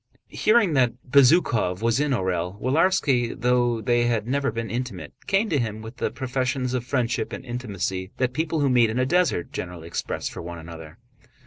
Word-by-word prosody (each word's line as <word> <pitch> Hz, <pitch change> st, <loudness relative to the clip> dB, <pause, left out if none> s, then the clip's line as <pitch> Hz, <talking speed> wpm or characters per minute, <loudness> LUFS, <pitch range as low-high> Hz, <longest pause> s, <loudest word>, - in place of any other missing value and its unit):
Hearing 215 Hz, -6 st, +3 dB
that 125 Hz, -4 st, +3 dB
Bezúkhov 125 Hz, -, +3 dB
was 115 Hz, +2 st, +2 dB
in 150 Hz, 0 st, +1 dB
Orël, 95 Hz, -5 st, -1 dB
Willarski, 135 Hz, -, +1 dB
though 120 Hz, -1 st, +2 dB
they 120 Hz, +2 st, +2 dB
had 115 Hz, -2 st, 0 dB
never 140 Hz, +2 st, 0 dB
been 115 Hz, 0 st, -4 dB
intimate, 125 Hz, +1 st, -5 dB
came 200 Hz, +3 st, +2 dB
to 150 Hz, -, +1 dB
him 110 Hz, -2 st, -3 dB
with 110 Hz, +3 st, -9 dB
the -, -, -1 dB
professions 130 Hz, -1 st, -2 dB
of 125 Hz, -2 st, -1 dB
friendship 125 Hz, -3 st, -1 dB
and -, -, -7 dB
intimacy 100 Hz, -6 st, -4 dB
that 130 Hz, -1 st, 0 dB
people 160 Hz, +2 st, -1 dB
who 140 Hz, -, +3 dB
meet 120 Hz, -3 st, +4 dB
in 110 Hz, -, -3 dB
a 130 Hz, -, +2 dB
desert 175 Hz, -, +1 dB
generally 90 Hz, -2 st, -6 dB
express 85 Hz, -, -4 dB
for -, -, -7 dB
one 85 Hz, 0 st, -7 dB
another. 80 Hz, 0 st, -10 dB
120 Hz, 185 wpm, -24 LUFS, 110-135 Hz, -, meet